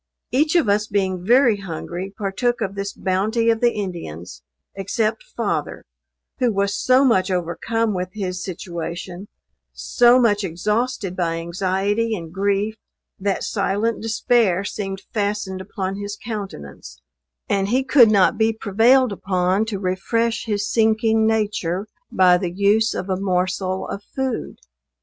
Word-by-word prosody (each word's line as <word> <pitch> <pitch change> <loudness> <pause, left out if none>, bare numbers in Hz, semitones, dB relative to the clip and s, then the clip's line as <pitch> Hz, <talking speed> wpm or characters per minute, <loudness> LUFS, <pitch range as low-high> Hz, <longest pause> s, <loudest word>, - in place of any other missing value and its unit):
Each 305 +5 +2
of 335 -9 +4
us 210 +1 +2
being 190 -3 -1
very 240 +1 +4
hungry, 180 0 -6
partook 215 +5 -1
of 195 - -2
this 200 0 -4
bounty 215 +5 +1
of 225 - -2
the 240 -1 +4
Indians, 90 - -6 0.3
except 215 - -1
father, - - -3 0.5
who 250 -3 +2
was 200 0 0
so 255 +2 +4
much 200 -7 +3
overcome 190 +6 -1
with 180 -1 -3
his 185 -3 -4
situation 175 +1 -6 0.5
so 245 +1 +4
much 210 -4 +2
exhausted 210 +3 -2
by 170 -2 -1
anxiety 195 +6 -1
and 165 -4 -8
grief, 200 +3 0 0.4
that 195 0 -1
silent 210 +2 -1
despair 225 -4 +2
seemed 195 -1 -5
fastened 205 -3 -2
upon 190 0 -4
his 205 0 -5
countenance, 190 - -8 0.5
and 195 -1 +1
he 255 +5 +1
could 260 -4 +6
not 205 +1 +3
be 220 0 +3
prevailed 225 +4 +3
upon 190 +1 0
to 220 -3 -3
refresh 205 +5 -1
his 210 -2 -1
sinking 220 0 +2
nature 205 -4 -1 0.3
by 180 -1 +5
the 180 - -2
use 205 +4 +2
of 185 - -4
a 190 -1 -1
morsel 185 0 -1
of 200 - -5
food. 265 -3 -3
200 Hz, 140 wpm, -21 LUFS, 185-225 Hz, 0.5 s, could